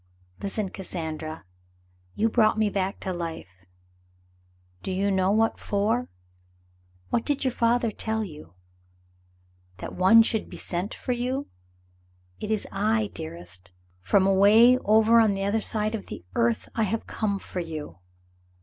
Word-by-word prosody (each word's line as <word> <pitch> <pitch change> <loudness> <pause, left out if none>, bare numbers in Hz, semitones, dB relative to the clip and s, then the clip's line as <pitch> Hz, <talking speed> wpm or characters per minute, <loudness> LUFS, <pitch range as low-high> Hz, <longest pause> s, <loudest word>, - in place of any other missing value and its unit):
"Listen, 200 0 -2
Cassandra. 160 - -6 0.7
You 220 - +2
brought 220 -1 +3
me 215 -1 +2
back 195 0 -2
to 190 - -3
life. 165 - -6 1.2
Do - - -6
you 195 +2 0
know 190 -1 +2
what 220 +2 +2
for? 220 +5 0 1.0
What 230 - +1
did 290 -2 -1
your 260 - +2
father 235 -1 +1
tell 220 +1 -2
you? 150 - -10 1.2
That - - -7
one 210 +5 +6
should 220 -1 -1
be - - -9
sent 180 +4 -3
for 255 - -4
you? 250 +3 -2 0.9
It 210 - -5
is 215 -2 0
I, 215 +1 0
dearest. 90 +2 -7 0.3
From 190 - +3
away 205 +6 +6
over 220 +1 +5
on 215 -3 +4
the 195 - -2
other 205 +3 +1
side 215 0 -1
of 220 - -5
the - - -8
earth, 115 +1 +1
I 225 - -1
have 220 +3 -2
come 205 -3 -2
for 190 - -6
you. 155 - -6
200 Hz, 145 wpm, -26 LUFS, 180-225 Hz, 1.2 s, one